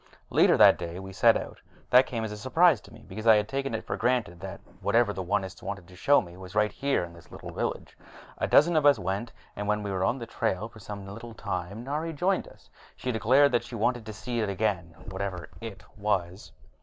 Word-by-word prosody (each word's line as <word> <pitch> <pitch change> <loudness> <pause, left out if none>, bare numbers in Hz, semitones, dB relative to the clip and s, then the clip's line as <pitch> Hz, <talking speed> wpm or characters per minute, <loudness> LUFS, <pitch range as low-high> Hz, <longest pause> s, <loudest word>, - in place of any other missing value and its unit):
Later - - +5
that - - +7
day 85 0 -5
we 95 0 -8
set - - +5
out. - - -8 0.3
That 125 +1 +7
came 115 -2 -3
as 110 - -3
a 105 - -6
surprise 140 +3 +4
to - - -16
me, 115 0 -15
because 110 +4 -6
I 110 - +9
had 105 0 +1
taken 135 -2 -2
it - - -4
for - - -2
granted 115 -7 0
that 95 -1 -7 0.2
whatever 115 -3 +2
the 95 - -4
Onists 95 +1 -2
wanted 100 -3 -6
to 90 - -15
show 145 +10 +4
me 85 -1 -12
was 95 +1 -11
right 105 0 +3
here 140 -8 0
in 85 -1 -8
this 85 -1 -16
little - - -8
village. - - -4 0.4
A - - 0
dozen 170 +3 +5
of 155 - +3
us 145 - +6
went, 100 +4 -3 0.2
and 105 0 -4
when 105 0 0
we 100 - -3
had 95 - -2
been 95 - +2
on 130 - 0
the 120 - -6
trail 110 -2 -2
for 115 - -15
some 100 -1 -8
little 115 +3 -9
time, 100 +1 -4
Nari 155 +5 -3
joined 185 +6 0
us, - - -18 0.3
declaring 130 +4 +3
that 120 - +2
she 120 - -8
wanted 115 +1 0
to 110 - -5
see 120 +3 -4
it 105 -3 0
again 95 -4 -1
whatever 95 -1 -4
it 105 -3 -8
was. 95 -3 -2
105 Hz, 235 wpm, -28 LUFS, 95-120 Hz, 0.4 s, I